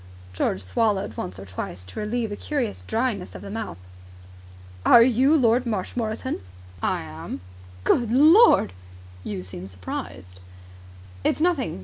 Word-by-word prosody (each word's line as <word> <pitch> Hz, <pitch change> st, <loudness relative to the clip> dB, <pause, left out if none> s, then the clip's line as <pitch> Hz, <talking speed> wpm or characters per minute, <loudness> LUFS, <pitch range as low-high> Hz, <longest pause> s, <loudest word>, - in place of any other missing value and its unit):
George 95 Hz, +1 st, -1 dB
swallowed 190 Hz, -, 0 dB
once 90 Hz, -2 st, -5 dB
or 95 Hz, -, -9 dB
twice 95 Hz, -1 st, -6 dB
to 90 Hz, 0 st, -9 dB
relieve 220 Hz, +1 st, -2 dB
a -, -, -3 dB
curious 255 Hz, -3 st, -3 dB
dryness 225 Hz, -5 st, -1 dB
of -, -, -8 dB
the 200 Hz, -, -7 dB
mouth. 225 Hz, 0 st, -5 dB, 1.1 s
"Are 235 Hz, -, +8 dB
you 260 Hz, +5 st, +4 dB
Lord 245 Hz, -1 st, +3 dB
Marshmoreton?" 220 Hz, +3 st, -2 dB, 0.4 s
"I -, -, 0 dB
am." 80 Hz, +3 st, -7 dB, 0.4 s
"Good 235 Hz, -, +2 dB
Lord!" 310 Hz, -, +6 dB, 0.5 s
"You 95 Hz, -2 st, -4 dB
seem 90 Hz, 0 st, -8 dB
surprised." 90 Hz, 0 st, -7 dB, 0.8 s
"It's -, -, +1 dB
nothing!" 320 Hz, -, 0 dB
215 Hz, 130 wpm, -24 LUFS, -, 1.1 s, Are